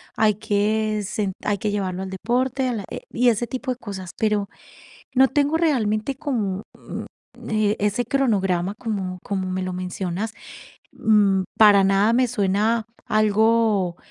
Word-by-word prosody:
hay 215 -2 +3
que 215 0 0
sen 200 0 -2
hay 205 -1 +1
que 210 +1 -2
llevarlo 190 -2 -2
al 190 - -6
deporte, 250 +6 0
a 250 - -1
la, 210 -3 -4
eh, - - -5
y 245 +1 +3
ese 235 +1 0
tipo 255 +1 -3
de 250 - -4
cosas. 190 -6 -7
Pero 210 -2 +1 0.7
no 265 +1 +6
tengo, 290 +2 +2
realmente, 245 -7 +1
como, 220 -9 -2 0.8
mm, - - -10
eh, 215 -1 +1
ese 210 +4 0
cronograma, 195 -9 +1
como 195 -6 -4
como 190 -2 -2
me 185 0 -2
lo 185 - -3
mencionas, 185 +3 -4 0.6
mm, 200 -3 +3 0.2
para 205 -3 +7
nada 195 +3 +3
me 250 +1 +3
suena 215 +1 +1 0.2
algo, 215 -3 +2
210 Hz, 155 wpm, -23 LUFS, 195-230 Hz, 0.8 s, para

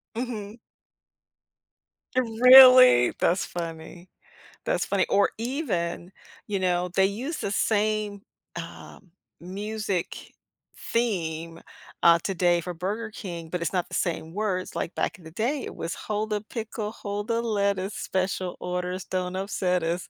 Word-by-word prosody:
Mhm. 225 -3 -5 1.6
Really? 255 - +8
That's 180 +2 +2
funny. 170 +1 -7 0.6
That's 175 - 0
funny, 190 +1 +1
or 200 - +3
even, 200 - -3 0.4
you 200 -2 -1
know, 180 -1 0
they 190 - +5
use 250 - -3
the 200 - -3
same, 210 -2 0 0.3
um, 185 -5 -10 0.3
music 200 +1 -4 0.4
theme, 165 -8 -2 0.4
uh, 170 0 +7
today 175 -2 +1
for 180 +2 -5
Burger 210 +6 -4
King, 170 -6 -7
but 180 0 -3
it's 170 - -2
not 180 -2 0
the - - -13
same 165 -1 -2
words, 195 -3 -2
like, 170 - -3
back 170 - -2
in 175 - -17
the 160 - -10
day, 250 - -1
it - - -8
was: 165 - -4
Hold 215 0 -3
the 210 - 0
pickle, 220 -2 -4
hold 205 0 -5
the 230 0 0
lettuce, 200 -2 0
special 185 -2 -2
orders, 180 0 -3
don't 185 0 -3
upset 185 -2 -1
us. 170 +2 -2
190 Hz, 135 wpm, -26 LUFS, 175-215 Hz, 1.6 s, Really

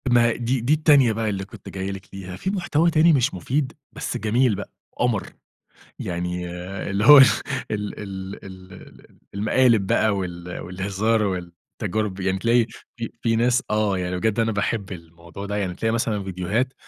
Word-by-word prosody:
ما 120 -1 +5
هي 115 - +1
دي 120 +1 -1
دي 125 +6 +2
التانية 145 -6 +5
بقى 110 0 -1
اللي 95 -1 -3
كنت 100 0 -12
جايِّ 95 0 -4
لِك 95 0 -8
ليها 95 -2 -7
في 190 - -3
محتوى 175 -4 +1
تاني 165 +1 +5
مش 130 -3 +2
مفيد 130 - -2 0.2
بس - - -4
جميل 120 +1 +2
بقى - - -7 0.3
قمر، 120 -5 0 0.7
يعني 90 0 -3 0.4
اللي 100 +2 0
هو 145 +2 +11
ال 135 - +11 0.5
ال 105 -1 -4
ال 95 -1 -7
ل 95 -1 -12
ل - - -19 0.3
المقالب 110 0 +3
بقى 110 - +3
وال 90 -2 -5
والهزار 100 +5 -1
والتجارب، 95 +2 -4
يعني 95 0 0
تلاقي 115 +2 +3 0.3
في 115 -2 -5
في 115 -1 +1
ناس 125 +2 +2
آه 105 -2 +1
يعني 90 0 -2
بجد 110 +3 0
أنا 115 0 +2
باحب 100 0 -2
الموضوع 85 +2 -9
ده، 100 +1 -3
يعني 95 -3 -2
بتلاقي 110 +5 -1
مثلًا 110 -3 -1
فيديوهات 95 +8 -1
105 Hz, 175 wpm, -23 LUFS, 95-120 Hz, 0.7 s, هو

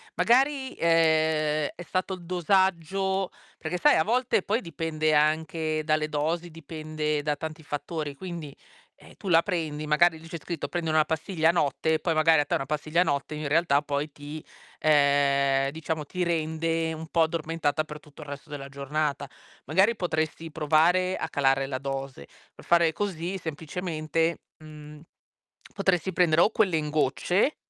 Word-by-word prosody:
magari, 265 +2 +2
ehm, 160 -2 +2
è 175 - -8
stato 185 +2 -2
il 175 - -13
dosaggio. 190 +1 +1 0.3
Perché 170 +3 -3
sai, 295 +9 +5
a - - +3
volte 240 -2 +1
poi 215 +5 0
dipende 155 -2 -1
anche 155 +1 +1
dalle 155 0 0
dosi, 165 +4 -1
dipende 155 -1 -3
da 150 0 -1
tanti 160 +1 -7
fattori. 145 0 -4
Quindi, 170 -4 -7 0.4
eh, - - -17
tu 195 - -10
la 165 0 +5
prendi, 155 -6 -3
magari 160 +2 +3
lì 165 - -13
c'è 165 +1 -6
scritto: 165 -5 -4
"prendere 165 -2 -2
una 155 - +5
pastiglia 160 0 0
a - - +6
notte" 160 -1 0
e 155 - +1
poi 165 0 -1
magari 160 0 +5
a 145 - +2
te - - 0
una 135 - -2
pastiglia 155 +3 0
a - - +6
notte 145 -1 -2
in 150 -1 -4
realtà 150 -2 +3
poi 145 +1 -2
ti 145 +2 -9 0.4
uhm, 140 -2 +3
diciamo 155 0 -4
ti 180 +4 -3
rende 165 0 -1
un 160 +1 -7
po' 165 - +1
addormentata 160 -2 0
per 150 -1 -9
tutto 150 0 -13
il 145 - -11
resto 145 +2 -8
della 140 -2 -6
giornata. 140 0 -3 0.4
Magari, 190 +10 +3
potresti 165 -2 -2
provare 165 +5 +2
a - - -4
calare 135 -1 +2
la 130 -1 -3
dose. 135 - -5 0.3
Per - - -15
fare 170 -1 +4
così 185 -1 -3
semplicemente, 160 0 -2 0.2
mhmm, 150 -1 -12 0.7
potresti 190 -2 +1
prendere 165 -2 +4
o 215 - +4
quelle 200 -7 +2
in 150 -1 -2
gocce 155 - +1
160 Hz, 165 wpm, -27 LUFS, 150-170 Hz, 0.7 s, a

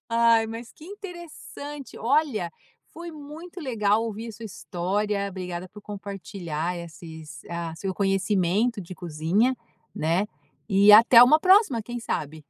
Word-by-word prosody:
Ai 230 -1 +4
mas 230 +1 -8
que 310 - -15
interessante, 345 - -9
olha, 245 - +1 0.4
foi 340 +1 -8
muito 315 +4 -10
legal 220 -6 +1
ouvir 225 +1 -5
a - - -7
sua 225 +2 -10
história, 200 0 -2
obrigada 180 -1 -6
por 210 - -13
compartilhar 190 -5 -5
esses, 160 -2 -10
ah, 170 -1 -4
seu 190 +2 -4
conhecimento 195 +3 +1
de 185 0 -9
cozinha, 175 +9 0 0.4
né. 165 +6 0 0.4
E 200 +1 +6
até 230 +2 +9
uma 300 +6 +6
próxima 375 - +5
quem 240 +2 -6
sabe. 155 -7 -4
210 Hz, 135 wpm, -25 LUFS, 180-245 Hz, 0.4 s, até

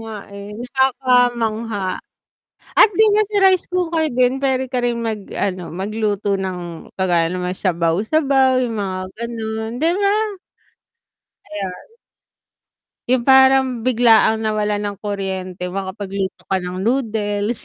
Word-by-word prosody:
nga, 225 0 -8 0.2
eh, 200 0 -8
nakakamangha. 240 -5 0 0.8
At - - +9
din 435 0 +5
yun 430 0 +3
si 425 - -3
rice 375 -2 +4
cooker 340 -3 0
din 255 0 +1
pwede 265 -1 +1
ka 250 - +1
ring 235 -1 0
mag-ano 200 -4 -3
magluto 205 +1 -1
ng 180 -3 -6
kagaya 175 -3 +2
nang 180 +1 -3
mga 180 - -4
sabaw-sabaw 255 - +2
yung 230 -2 -2
mga 190 -2 -2 0.2
ganun, 220 -1 -4
'di 325 +2 +3
ba? 400 +1 +3 1.4
Ayan. 195 -3 -4 1.3
Yung 250 -1 +2
parang 265 -2 +5
biglaang 225 -2 +4
nawalan 210 -1 0
ng 205 -1 -3
kuryente 190 -3 -4
makapagluto 195 0 -4
ka 190 -1 -1
ng 180 +2 -5
noodles. 220 -3 -1
220 Hz, 120 wpm, -19 LUFS, 195-255 Hz, 1.4 s, At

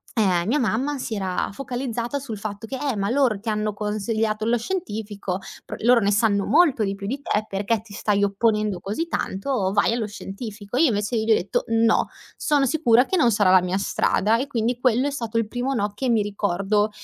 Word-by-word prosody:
uhm, 185 -6 +2
mia 285 +6 +2
mamma 260 +5 0
si 245 -3 -4
era 190 -2 -2
focalizzata 245 0 -3
sul 230 -7 -6
fatto 205 +1 -6
che: 265 +4 -5
"Eh, 275 -5 -2
ma 200 +3 -1
loro 250 -7 +2
ti 225 - -14
hanno 210 -1 -1
consigliato 215 +1 -1
lo 240 +1 +2
scientifico, 215 - -4 0.3
pro - - -7
loro 240 +1 +5
ne 200 +1 +2
sanno 205 -1 +2
molto 295 -8 +4
di 195 0 -1
più 200 0 -8
di 270 +7 -3
te, 215 -5 -1
perché 205 +3 -1
ti 215 -2 -15
stai 205 -1 +1
opponendo 210 -1 +1
così 215 - -3
tanto? 195 - -1
Vai 205 +3 +2
allo 225 -3 -1
scientifico." 205 +2 -7
Io, 315 +1 +5
invece 210 0 -1
io 220 -1 0
gli 220 -1 +5
detto: 185 - -1
"No. 225 0 +3 0.3
Sono 290 -2 +2
sicura 250 -3 +4
che 375 - 0
non 245 -7 +4
sarà 205 -3 +3
la 185 -1 +7
mia 180 +1 -1
strada." 215 +2 +1
E 275 - -2
quindi, 240 -1 -1
quello 255 +2 +2
è - - -2
stato 230 -4 -3
il 225 -2 +1
primo 250 +4 -2
no 205 -1 0
che 255 +4 -2
mi 220 -3 +3
ricordo 205 +1 0
220 Hz, 210 wpm, -23 LUFS, 205-245 Hz, 0.3 s, la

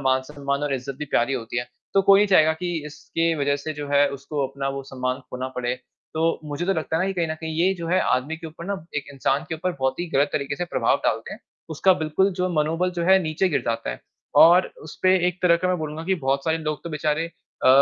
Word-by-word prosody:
मान-सम्मान 140 +2 -1
और 145 -2 0
इज़्ज़त 130 +1 -5
भी - - -3
प्यारी 135 -2 +1
होती 120 -1 -3
है, 120 - -3 0.3
तो 195 - +6
कोई 195 0 +7
नहीं 210 - +4
चाहेगा 160 -4 +5
कि 175 +2 -4
इसके 165 +2 -1
वजह 140 0 +1
से 155 +2 -5
जो 145 0 -5
है, 145 0 +4
उसको 140 0 -3
अपना 135 +1 -4
वो 135 0 -4
सम्मान 130 -1 -3
खोना 130 +1 -4
पड़े। 125 0 -1 0.4
तो 165 +1 +1
मुझे 150 +3 -4
तो 195 - +3
लगता 160 -2 -2
है 175 - +1
ना - - +1
कि 195 - -1
कहीं 170 -2 0
न 155 - -2
कहीं 160 -1 -4
ये 185 +2 +4
जो 165 - -4
है 185 +2 +3
आदमी 135 +6 0
के 165 0 -8
ऊपर 165 +2 -10
ना 200 - -1 0.2
एक 145 - -2
इंसान 135 +1 0
के - - -2
ऊपर 180 +3 -2
बहुत 130 +4 0
ही 175 - -2
ग़लत 140 0 +3
तरीक़े 140 -1 -2
से 175 - -2
प्रभाव - - +1
डालते - - -1
हैं, - - -9 0.3
उसका 175 +5 +4
बिल्कुल 190 +6 +2
जो 180 0 +1
मनोबल 165 +4 0
जो 170 - 0
है 190 0 +7
नीचे 160 +4 0
गिर 150 - +1
जाता 115 - -2
है। - - -7 0.4
और 175 +3 +6 0.2
उसपे 185 +4 +2
एक 180 0 -5
तरह 170 -2 +5
का 185 - +2
मैं 180 - +1
बोलूँगा 155 +1 -5
कि 190 +2 +1
बहुत 135 +1 +1
सारे 160 0 +1
लोग 155 -2 -3
तो 170 - -5
बेचारे 150 +1 0
अ, 165 -5 -3
155 Hz, 255 wpm, -24 LUFS, 140-170 Hz, 0.4 s, कोई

